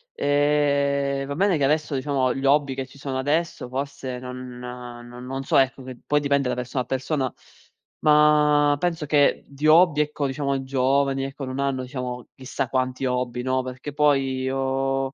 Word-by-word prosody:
Ehm, 140 -1 +1
va 140 - -4
bene 190 -1 +2
che 140 - -1
adesso, 150 +1 +1
diciamo 130 -1 0
gli 135 - -5
hobby 140 -1 +3
che 130 0 -5
ci 135 - -17
sono 135 -1 -4
adesso 155 0 -1
forse, 135 -1 -4
non 125 0 -8
non 125 +1 -7
so - - +2
ecco, 135 0 +2
che 130 -1 -8
poi 150 - +2
dipende 140 -2 +1
da - - -1
persona 125 +1 -3
a - - -19
persona, 130 0 -1 0.7
ma 150 -1 +4
penso 170 -2 -1
che 145 -1 +3
di 140 +2 -2
hobby 155 -1 +6
ecco, 150 -1 -2
diciamo 140 0 -1
i 135 - -3
giovani 135 +1 +1
ecco, 135 0 -6
non 130 +1 -5
hanno 135 -2 -1
diciamo, 125 -1 -6
chissà 130 0 -4
quanti 130 0 -1
hobby, 125 -1 -1
no, 130 0 +1
perché 130 +3 -7
poi 135 -3 +1
o 135 0 -1
135 Hz, 175 wpm, -24 LUFS, 130-145 Hz, 0.7 s, hobby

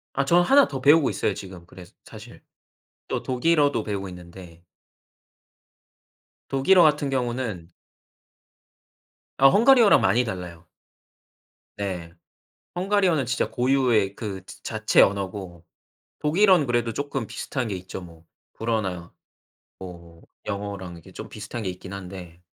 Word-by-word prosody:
아 140 - +1
저는 175 +5 +4
1 275 +6 +5
더 135 - -5
배우고 145 +1 +5
있어요, 105 - -1
지금. 95 -3 -10
그래스 90 0 -15
사실. - - -13 0.7
또 - - -2
독일어도 145 -1 +1
배우고 100 -2 -4
있는데 85 -1 -13 1.9
독일어 170 +7 +4
같은 150 -2 +2
경우는 120 -9 -3 1.7
아 135 - +7
헝가리어랑 230 - +6
많이 125 +2 +3
달라요. 90 -5 -7 1.1
네. 90 -5 -5 0.6
헝가리어는 185 -6 +1
진짜 130 +3 -1
고유의 125 -6 +1
그 100 -5 -6
즈 - - -13
자체 110 -1 +2
언어고 95 -3 -1 0.5
독일어는 175 0 +3
그래도 120 -1 0
쪼끔 140 -4 -4
비슷한 130 -4 -4
게 100 - -3
있죠. 90 +1 -8
뭐 85 -2 -14 0.3
불어나 95 -7 -3 0.7
뭐 85 -3 -12 0.2
영어랑 100 -3 -5
이렇게 85 +2 -14
좀 110 - -9
비슷한 110 +2 -7
게 95 - -2
있긴 90 +1 -10
한데. 90 -3 -10
110 Hz, 265 characters per minute, -24 LUFS, 90-135 Hz, 1.9 s, 아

